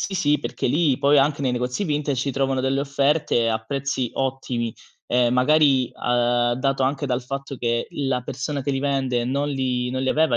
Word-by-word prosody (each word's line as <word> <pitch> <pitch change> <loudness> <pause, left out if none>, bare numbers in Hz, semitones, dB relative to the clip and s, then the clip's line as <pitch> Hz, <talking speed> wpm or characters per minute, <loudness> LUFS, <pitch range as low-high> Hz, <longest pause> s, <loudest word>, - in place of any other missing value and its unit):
Sì, 195 - -3
sì, 150 -5 +2
perché 135 - -3
lì 145 -1 +2
poi, 145 +1 +4
anche 140 +1 +2
nei 130 - +1
negozi 125 +8 -2
vintage, 150 -4 -1
si 140 - -1
trovano 135 -1 0
delle 135 +1 0
offerte 140 -3 +1
a 110 - 0
prezzi 135 -1 -2
ottimi. 130 -3 -2 0.3
Ehm, 120 0 +2
magari, 135 -1 +4
uhm, 120 0 +1
dato 135 +1 0
anche 135 +1 -1
dal 125 0 0
fatto 135 +1 -6
che, 120 -1 -1
l 140 - -3
la 125 -1 0
persona 135 +3 -4
che 140 - -1
li 135 - -1
vende, 135 -4 0
non 140 +3 -1
li 130 -3 -1
non 130 +1 -2
li 130 - 0
aveva 155 -6 +2
135 Hz, 205 wpm, -23 LUFS, 125-140 Hz, 0.3 s, poi